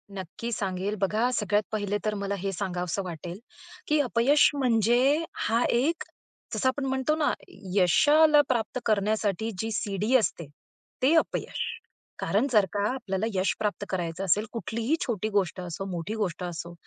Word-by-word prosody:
नक्की 190 Hz, +6 st, -6 dB
सांगेल 195 Hz, -1 st, -2 dB
बघा, 215 Hz, +5 st, +2 dB
सगळ्यात 210 Hz, -1 st, +1 dB
पहिले 205 Hz, -1 st, -1 dB
तर 215 Hz, -, +1 dB
मला 200 Hz, 0 st, -2 dB
हे 195 Hz, +1 st, -2 dB
सांगावंसं 180 Hz, 0 st, -2 dB
वाटेल, 175 Hz, +2 st, -7 dB, 0.5 s
की 305 Hz, 0 st, +3 dB
अपयश 255 Hz, +3 st, +4 dB
म्हणजे 250 Hz, +4 st, +3 dB, 0.2 s
हा 230 Hz, +2 st, +2 dB
एक, 290 Hz, +8 st, +1 dB, 0.5 s
जसं 260 Hz, -, +1 dB
आपण 270 Hz, +1 st, -2 dB
म्हणतो 265 Hz, +3 st, +1 dB
ना, 310 Hz, -2 st, +2 dB, 0.4 s
यशाला 295 Hz, -, +6 dB
प्राप्त 240 Hz, 0 st, 0 dB
करण्यासाठी 215 Hz, 0 st, +1 dB
जी 225 Hz, +2 st, -1 dB
शिडी 210 Hz, +1 st, 0 dB
असते, 175 Hz, -, -2 dB, 0.5 s
ते 270 Hz, +5 st, +4 dB
अपयश. 325 Hz, -, 0 dB, 0.5 s
कारण 215 Hz, +7 st, +1 dB
जर 210 Hz, -4 st, +5 dB
का 205 Hz, 0 st, +1 dB
आपल्याला 205 Hz, -6 st, -2 dB
यश 185 Hz, 0 st, +1 dB
प्राप्त 210 Hz, -1 st, -1 dB
करायचं 175 Hz, -1 st, -3 dB
असेल, 200 Hz, +4 st, +2 dB
कुठलीही 230 Hz, -, -1 dB
छोटी 215 Hz, -4 st, -2 dB
गोष्ट 195 Hz, -3 st, 0 dB
असो, 180 Hz, +2 st, -5 dB
मोठी 175 Hz, +3 st, -4 dB
गोष्ट 190 Hz, -5 st, -2 dB
असो, 170 Hz, -1 st, -5 dB
210 Hz, 150 wpm, -27 LUFS, 190-245 Hz, 0.5 s, यशाला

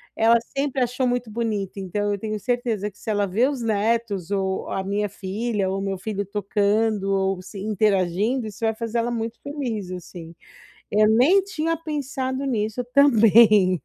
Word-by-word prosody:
ela 230 Hz, +1 st, +5 dB, 0.2 s
sempre 275 Hz, -1 st, 0 dB
achou 250 Hz, +1 st, -1 dB
muito 245 Hz, -2 st, -2 dB
bonito, 210 Hz, -4 st, -3 dB
então 205 Hz, +2 st, -2 dB
eu 200 Hz, -, -2 dB
tenho 215 Hz, +1 st, -3 dB
certeza 225 Hz, -2 st, -1 dB
que 195 Hz, -, -24 dB
se -, -, -7 dB
ela 205 Hz, -1 st, +1 dB
ver 225 Hz, +8 st, +2 dB
os 270 Hz, -4 st, -4 dB
netos, 215 Hz, -3 st, 0 dB
ou 190 Hz, -1 st, -1 dB
a 190 Hz, -, -2 dB
minha 205 Hz, +2 st, -1 dB
filha, 200 Hz, +1 st, -2 dB
ou 195 Hz, +1 st, -2 dB
o -, -, -4 dB
meu 195 Hz, -1 st, -2 dB
filho 200 Hz, +1 st, -4 dB
tocando, 205 Hz, +1 st, 0 dB
ou 195 Hz, -1 st, 0 dB
se 195 Hz, +2 st, -10 dB
interagindo, 210 Hz, +3 st, +1 dB
isso 215 Hz, 0 st, -8 dB
vai 220 Hz, 0 st, +1 dB
fazer 230 Hz, +1 st, -3 dB
ela 235 Hz, -, 0 dB
muito 230 Hz, 0 st, -4 dB
feliz, 245 Hz, -10 st, -4 dB
assim. 170 Hz, -2 st, -9 dB, 0.6 s
Eu 215 Hz, +1 st, +4 dB
nem 255 Hz, -, +5 dB
tinha 330 Hz, -4 st, -2 dB
pensado 280 Hz, -4 st, -3 dB
nisso 225 Hz, -2 st, -1 dB
também. 215 Hz, -, +6 dB
215 Hz, 175 wpm, -23 LUFS, 195-240 Hz, 0.6 s, também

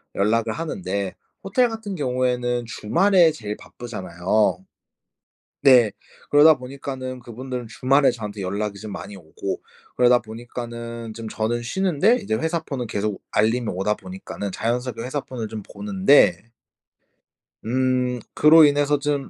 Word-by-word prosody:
연락을 110 Hz, +2 st, +1 dB
하는데 150 Hz, -, -3 dB, 0.3 s
호텔 245 Hz, +6 st, +2 dB
같은 220 Hz, -4 st, -5 dB
경우에는 125 Hz, -3 st, 0 dB
주말에 170 Hz, -, +3 dB
제일 105 Hz, -8 st, -6 dB
바쁘잖아요. 95 Hz, -3 st, -2 dB, 1.0 s
네. 125 Hz, -6 st, +6 dB, 0.4 s
그러다 150 Hz, +2 st, +7 dB
보니까는 130 Hz, -1 st, -6 dB
그분들은 125 Hz, 0 st, -6 dB
주말에 135 Hz, +3 st, +3 dB
저한테 105 Hz, -3 st, -6 dB
연락이 100 Hz, +2 st, -3 dB
좀 110 Hz, -1 st, -7 dB
많이 105 Hz, -, -7 dB
오고 95 Hz, +2 st, -6 dB, 0.3 s
그러다 125 Hz, 0 st, +5 dB
보니까는 115 Hz, 0 st, -7 dB
좀 115 Hz, 0 st, -7 dB
저는 115 Hz, +2 st, -2 dB
쉬는데 190 Hz, -, +2 dB
이제 200 Hz, -, -1 dB
회사폰은 140 Hz, -3 st, -2 dB
계속 105 Hz, -1 st, -3 dB
알림이 115 Hz, +2 st, +1 dB
오다 95 Hz, +4 st, 0 dB
보니까는 185 Hz, -, -7 dB
자연스럽게 120 Hz, +2 st, -2 dB
회사폰을 130 Hz, -3 st, -4 dB
좀 110 Hz, -2 st, -6 dB
보는데. 190 Hz, -, +2 dB, 1.1 s
음 125 Hz, 0 st, 0 dB
그로 155 Hz, +1 st, +7 dB
인해서 145 Hz, 0 st, +2 dB
좀 145 Hz, -1 st, -2 dB
125 Hz, 310 characters per minute, -23 LUFS, 110-145 Hz, 1.1 s, 그러다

